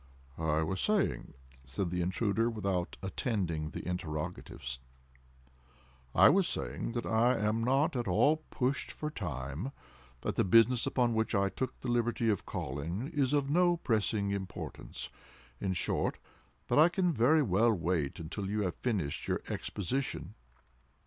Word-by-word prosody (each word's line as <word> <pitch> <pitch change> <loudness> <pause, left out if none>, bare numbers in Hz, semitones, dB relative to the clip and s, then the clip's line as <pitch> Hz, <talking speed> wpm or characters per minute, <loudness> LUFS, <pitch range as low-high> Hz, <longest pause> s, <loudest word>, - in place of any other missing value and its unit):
"I 80 -1 +1
was 90 +4 -2
saying," 210 - 0 0.3
said 85 +7 -3
the 90 0 0
intruder, 105 +5 +1
without 100 -5 -2
attending 95 -7 -1
to - - -7
the - - -8
interrogatives,—"I 65 -3 -3
was 190 - +4
saying 115 - -3
that 120 -1 -2
I 115 +3 +3
am 110 +1 +1
not 135 +6 +2
at 120 -3 -1
all 145 - +4
pushed 130 +2 -1
for 150 0 -4
time—that 70 - -6
the - - +2
business 115 +5 +5
upon 120 -2 +2
which 110 0 0
I 100 0 +3
took 130 +6 -4
the - - -5
liberty 120 -1 +1
of 100 - -3
calling, 80 - -3
is 140 -3 +2
of 140 -1 +1
no 175 +1 +4
pressing 105 -7 0
importance—in 95 -6 -6
short, 90 - 0 0.5
that - - +3
I 160 +3 +8
can 180 -1 +1
very 145 +6 +4
well 115 +1 +3
wait 85 -6 -1
until 95 +5 -4
you 105 +1 0
have 90 -2 -2
finished 95 - -2
your - - 0
Exposition." 130 +8 -3
100 Hz, 140 wpm, -32 LUFS, 80-120 Hz, 0.5 s, I